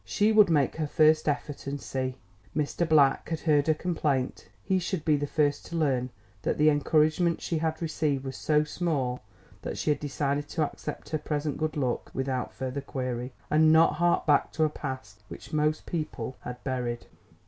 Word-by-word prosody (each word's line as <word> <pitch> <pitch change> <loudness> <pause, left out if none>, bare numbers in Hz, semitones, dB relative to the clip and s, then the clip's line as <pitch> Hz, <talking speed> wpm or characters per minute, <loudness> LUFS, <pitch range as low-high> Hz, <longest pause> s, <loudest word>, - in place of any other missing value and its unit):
She 210 +1 +2
would 210 -3 +6
make 150 -3 +2
her 155 -2 -1
first 155 +1 +4
effort 145 -1 -3
and 140 +1 -3
see. 130 -1 -3 0.4
Mr. 155 +3 0
Black 145 -4 +4
had 160 -2 -2
heard 150 -2 +3
her 155 - +4
complaint; 150 -6 -1 0.2
he 190 -1 +1
should 180 -2 -3
be 155 - +4
the 145 0 -1
first 145 -1 +1
to 170 - -6
learn 130 -6 +1 0.3
that - - -1
the 150 +1 +5
encouragement 155 +3 +2
she 165 - -2
had 160 0 -1
received 150 -4 -1
was 130 -1 -5
so 150 +2 +2
small 150 -6 -2 0.4
that - - -5
she 150 - +1
had 150 - 0
decided 145 0 -2
to 160 - 0
accept 145 - -6
her 155 - -1
present 150 -1 -2
good 155 0 -1
luck 130 -4 -1
without 130 -1 -2
further 130 +1 -4
query, 125 -2 -4 0.2
and 155 +1 +5
not 160 0 +6
hark 175 +2 +2
back 145 -2 +3
to 160 - +1
a 155 - +3
past 130 -3 -7
which - - -11
most 150 0 +1
people 150 -7 -4
had 125 0 -8
buried. 125 -3 -3
150 Hz, 190 wpm, -28 LUFS, 135-155 Hz, 0.4 s, would